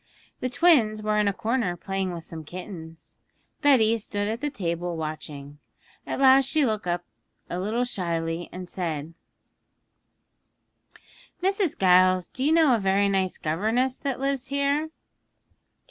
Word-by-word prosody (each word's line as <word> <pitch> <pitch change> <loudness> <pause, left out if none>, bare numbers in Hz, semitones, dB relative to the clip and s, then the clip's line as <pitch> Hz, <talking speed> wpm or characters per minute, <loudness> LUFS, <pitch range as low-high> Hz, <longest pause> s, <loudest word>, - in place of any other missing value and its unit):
The 255 - -2
twins 240 -8 +3
were 210 0 +1
in 210 - +2
a - - +3
corner 225 -3 -1
playing 195 +1 -3
with 170 -2 -6
some 160 -1 -7
kittens. 165 -1 -10 0.4
Betty 230 -6 +4
stood 205 -1 -3
at 225 +3 -3
the 295 - -1
table 175 - -3
watching. 150 -2 -7 0.5
At - - -3
last 270 0 +6
she 295 +1 +3
looked 215 -5 -2
up 175 0 -1 0.5
a 175 - -2
little 220 +6 0
shyly 170 -6 -3
and 180 0 -7
said, 165 -4 -4 2.3
'Mrs. 390 -3 +1
Giles, 185 -1 +4
do 260 - -5
you 295 - +3
know 320 -5 +5
a 230 - +2
very 195 0 +2
nice 190 -2 0
governess 220 +11 0
that 275 -3 -3
lives 275 -1 -1
here?' 280 +2 0
205 Hz, 145 wpm, -25 LUFS, 175-260 Hz, 2.3 s, last